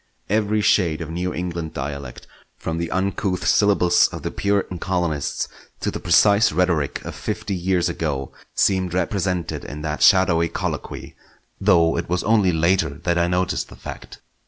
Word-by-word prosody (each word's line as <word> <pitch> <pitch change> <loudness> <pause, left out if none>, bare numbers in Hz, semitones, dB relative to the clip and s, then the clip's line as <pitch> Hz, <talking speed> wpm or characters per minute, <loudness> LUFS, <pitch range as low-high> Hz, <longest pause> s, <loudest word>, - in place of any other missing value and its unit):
Every 105 +1 +1
shade 85 -6 +2
of 80 -1 -5
New 90 +2 -2
England 85 -3 -4
dialect, 70 -2 -6 0.3
from 80 0 -3
the 85 -1 -2
uncouth 95 -1 -1
syllables 95 -4 +4
of - - -8
the - - -3
Puritan 100 -3 -1
colonists 85 -6 -1 0.3
to - - -2
the - - -5
precise 100 +5 +4
rhetoric 80 -4 0
of - - -5
fifty - - -4
years 90 -1 +1
ago, 75 -6 -3 0.2
seemed 95 -2 +1
represented 90 -3 -1
in 75 +1 -7
that 75 -1 -3
shadowy 85 -3 +5
colloquy, - - -5 0.4
though 85 -1 +3
it 85 - -5
was 90 +1 0
only 105 -4 +3
later 85 +1 +2
that 85 -1 +1
I 85 - +2
noticed 90 0 -1
the - - -12
fact. - - -9
90 Hz, 160 wpm, -22 LUFS, 80-95 Hz, 0.4 s, shadowy